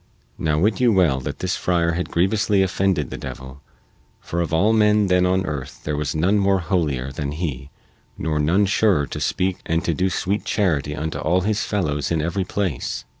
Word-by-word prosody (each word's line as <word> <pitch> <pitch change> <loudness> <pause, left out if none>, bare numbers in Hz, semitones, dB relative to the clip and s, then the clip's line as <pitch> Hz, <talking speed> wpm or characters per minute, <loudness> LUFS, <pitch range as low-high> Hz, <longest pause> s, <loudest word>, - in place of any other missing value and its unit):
Now 75 -2 +1
wit 105 +9 +1
you 120 -2 +5
well 85 -10 +3
that 65 - -5
this 95 0 -1
friar 85 -2 +1
had 90 +2 -3
grievously 95 +2 +2
offended 95 -5 0
the - - -6
devil, 65 +2 -8 0.6
for 85 - -3
of 85 - -2
all 100 +7 +3
men 105 -1 +4
then 90 0 +3
on 95 0 +1
earth 70 -5 -5
there 75 - -2
was 75 +1 -2
none 95 +7 +2
more 100 0 +3
holier 75 -8 -1
than 70 +1 -4
he 70 -5 -4 0.5
nor 75 -2 -1
none 85 +8 +3
surer 100 -6 +2
to - - -6
speak 95 0 0
and 85 +2 -1
to 85 - +1
do 95 +5 0
sweet 95 +3 -1
charity 75 -8 0
unto 80 +1 -4
all 90 +4 +1
his 105 +2 0
fellows 75 -9 -1
in 85 - 0
every 85 +5 -1
place. 95 -8 -3
85 Hz, 195 wpm, -22 LUFS, 75-95 Hz, 0.6 s, you